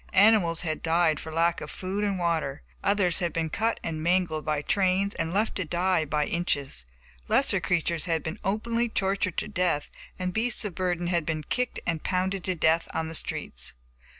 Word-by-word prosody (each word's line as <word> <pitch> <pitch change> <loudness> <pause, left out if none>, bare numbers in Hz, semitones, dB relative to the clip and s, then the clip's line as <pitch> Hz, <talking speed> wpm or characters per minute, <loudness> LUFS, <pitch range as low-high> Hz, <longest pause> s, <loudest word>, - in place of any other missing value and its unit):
Animals 195 -5 +5
had 155 -3 -3
died 165 -2 +2
for 160 - -7
lack 165 +1 +1
of - - -6
food 190 +2 -3
and 200 -2 0
water, 165 -5 -1 0.2
others 195 -4 +3
had 175 -2 0
been 160 -1 -2
cut 225 +6 0
and 160 -1 -3
mangled 170 -2 +1
by 150 -1 -1
trains 195 +2 +2
and 165 0 -2
left 210 +4 +1
to 185 - 0
die 175 0 +1
by 150 0 0
inches, 140 - -1 0.4
lesser - - +3
creatures 170 -1 0
had 165 -3 0
been 160 - -5
openly 230 +4 0
tortured 195 -4 0
to - - -1
death, 180 -7 0 0.3
and 185 0 -2
beasts 225 +1 +2
of 200 - -3
burden 175 -1 -1
had 175 -1 +1
been 155 -1 -2
kicked 250 - -1
and 165 -2 -1
pounded 185 +1 -1
to 185 - 0
death 160 0 +2
on 160 0 -1
the - - -6
streets. - - -1
175 Hz, 190 wpm, -27 LUFS, 160-190 Hz, 0.4 s, Animals